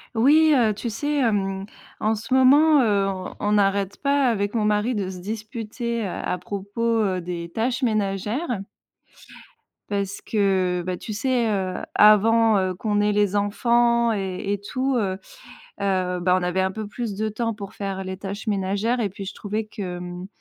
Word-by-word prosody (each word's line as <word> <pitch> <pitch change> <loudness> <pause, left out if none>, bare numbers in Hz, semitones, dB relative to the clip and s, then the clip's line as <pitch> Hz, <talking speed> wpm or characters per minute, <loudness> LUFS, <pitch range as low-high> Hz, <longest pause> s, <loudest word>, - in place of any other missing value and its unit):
Oui, 300 +6 +5
heu, 230 -5 +3
tu 235 +4 -4
sais, 290 +6 -1
hem, 195 -5 0 0.4
en 220 +1 +2
ce 230 +5 -4
moment, 285 +3 +6
heu, 200 -4 +2
on 185 -1 -4
on 205 - 0
n'arrête 200 -1 +2
pas 280 -1 +2
avec 205 -1 -1
mon 215 -2 +1
mari 210 +4 +1
de 200 -3 -2
se 185 -1 -7
disputer, 225 +3 -4
heu, 195 - -2
à 180 - -3
propos, 200 +4 -6 0.2
heu, 190 -3 0
des 170 -1 -5
tâches 240 +8 -1
ménagères 215 - -1 1.3
parce 200 -1 -2
que, 190 -4 +1
bah, 185 0 -2
tu 215 - -8
sais, 240 +1 +1
heu, 190 -3 -1 0.2
avant, 220 +1 +6
heu, 185 -1 0
qu'on 205 +2 0
ait 210 0 +2
les 205 -1 +1
enfants 235 +3 +2
et 195 0 -2
et - - -1
tout, 260 +6 -1
heu 190 -4 -1 0.6
heu, 185 -2 0
bah, 180 +1 +3
on - - -4
avait 180 +1 0
un 190 0 +1
peu 215 +2 -5
plus 215 0 -4
de 215 +2 -1
temps 230 +1 -2
pour 200 -2 -8
faire 195 -1 -4
les 190 0 -5
tâches 200 +3 -6
ménagères 205 +4 0
et 215 - +1
puis 195 +1 -8
je 195 - -6
trouvais 215 +1 -3
que, 195 -4 -6
mmh, 180 +1 -7
205 Hz, 180 wpm, -23 LUFS, 195-230 Hz, 1.3 s, moment